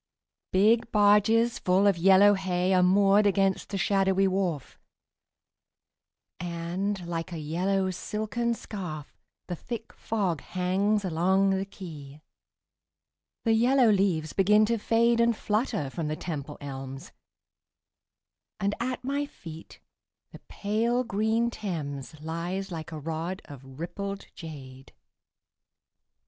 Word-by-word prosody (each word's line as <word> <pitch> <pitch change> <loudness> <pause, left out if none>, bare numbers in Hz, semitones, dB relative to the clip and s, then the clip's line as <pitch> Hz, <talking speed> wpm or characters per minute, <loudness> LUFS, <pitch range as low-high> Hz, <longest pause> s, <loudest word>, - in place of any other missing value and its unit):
Big 225 +5 +3
barges 210 +3 +4
full 185 +2 +2
of 200 -2 +4
yellow 195 +4 +6
hay 185 -1 0
Are 185 - +4
moored 200 +3 +4
against 195 -1 +1
the 200 - -3
shadowy 195 +1 +2
wharf, 185 -7 -2 1.6
And, 175 +3 -3
like 170 +1 -4
a 170 - -5
yellow 185 +5 0
silken 220 +5 -2
scarf, 175 -10 -7 0.3
The 175 - -4
thick 225 +6 -7
fog 190 -9 -2
hangs 195 +3 0
along 190 +3 +2
the 190 0 0
quay. 155 -7 -10 1.2
The 225 - +3
yellow 245 +1 +4
leaves 185 -6 +1
begin 210 +2 +4
to 230 +1 0
fade 230 +2 +2
And 235 -1 +2
flutter 210 - -1
from 165 0 -3
the 155 - -2
Temple 150 -3 -6
elms, 135 -1 -7 1.5
And 200 +1 0
at 250 +1 -3
my 280 +2 -1
feet 165 - -12 0.5
the - - -11
pale 230 +4 0
green 225 +2 0
Thames 155 - -5
Lies 170 +5 -4
like 160 -1 -6
a 160 - -5
rod 165 +5 -4
of 135 -1 -12
rippled 195 +4 -5
jade. 135 -5 -10
190 Hz, 120 wpm, -27 LUFS, 165-210 Hz, 1.6 s, yellow